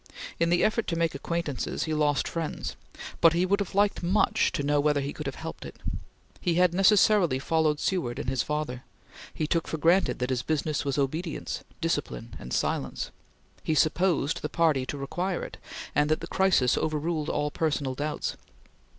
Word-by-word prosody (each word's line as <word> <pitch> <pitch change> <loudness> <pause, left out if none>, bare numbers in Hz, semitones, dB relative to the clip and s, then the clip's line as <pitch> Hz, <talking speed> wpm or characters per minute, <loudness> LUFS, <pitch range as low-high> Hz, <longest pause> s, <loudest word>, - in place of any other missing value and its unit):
In 170 - +3
the 175 0 +3
effort 220 +1 +1
to 170 - -1
make 165 -1 +1
acquaintances, 155 -1 -2
he 160 - -2
lost 150 -2 +2
friends, 165 -2 -4 0.4
but 165 -1 +6
he 175 +2 +2
would 200 +2 +2
have 200 -2 -4
liked 205 0 +2
much 180 +4 +2
to 145 - -1
know 145 +1 +2
whether 145 0 +2
he 140 +1 -3
could 150 - -6
have 135 - -3
helped - - -7
it. - - -9 0.6
He 175 -2 0
had 180 0 +4
necessarily 195 - +5
followed 155 +1 +1
Seward 170 -11 -1
and - - -4
his 130 -2 +1
father; 150 -5 -3 0.5
he 155 - -2
took 165 +1 0
for 160 - -3
granted 170 +5 +3
that 125 +1 -2
his 125 -2 0
business 155 +1 -1
was 140 -1 -1
obedience, 155 +4 -2 0.2
discipline, 145 -7 -2
and 60 - -9
silence; - - -1 0.5
he 155 - 0
supposed 165 -1 +2
the 150 - -3
party 155 -6 +2
to 145 - -4
require 175 +7 -2
it, - - -8 0.4
and 150 +1 +2
that 155 - +2
the - - -4
crisis 185 -10 +3
overruled 155 0 -1
all 150 0 0
personal 145 -5 -1
doubts. 150 +3 -3
155 Hz, 185 wpm, -27 LUFS, 145-170 Hz, 0.6 s, but